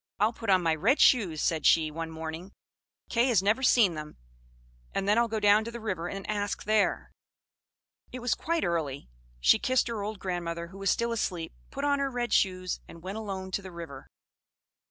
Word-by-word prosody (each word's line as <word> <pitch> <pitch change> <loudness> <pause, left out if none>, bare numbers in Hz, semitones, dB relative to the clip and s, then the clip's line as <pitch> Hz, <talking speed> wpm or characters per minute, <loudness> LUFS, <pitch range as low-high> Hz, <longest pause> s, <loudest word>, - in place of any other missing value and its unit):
"I'll 215 +3 +3
put 225 -2 -6
on 185 -2 +4
my 165 -1 +3
red 220 - +2
shoes," 185 - +4
said 160 -2 0
she, 160 -2 +4
one 165 +1 -5
morning; 160 +4 -7 0.5
"Kay 235 +2 +2
has 220 -7 +3
never 215 +6 +2
seen 235 -8 +4
them, 150 -1 -8 0.8
and 195 - -1
then 210 +3 +4
I'll 235 - +3
go 220 -1 -2
down 205 +1 +5
to - - -4
the 235 - -7
river 185 -6 -3
and 195 -1 -6
ask 205 -1 -2
there." 215 -1 +1 1.0
It - - -6
was 245 -1 0
quite 335 0 -1
early; 145 - -3 0.3
she - - +5
kissed 255 -1 +1
her 225 -3 -3
old 210 +1 -4
grandmother, 170 -2 -4
who 195 +2 -12
was 195 -1 0
still 235 +4 +1
asleep, 180 -7 -3 0.2
put 280 - -6
on 285 -1 +2
her 275 -1 0
red 245 -2 -2
shoes, 185 -2 +1
and 165 0 -13
went 195 +4 -5
alone 190 -3 -5
to 200 - -1
the 190 -1 -9
river. 165 -6 -9
195 Hz, 200 wpm, -28 LUFS, 170-225 Hz, 1.0 s, down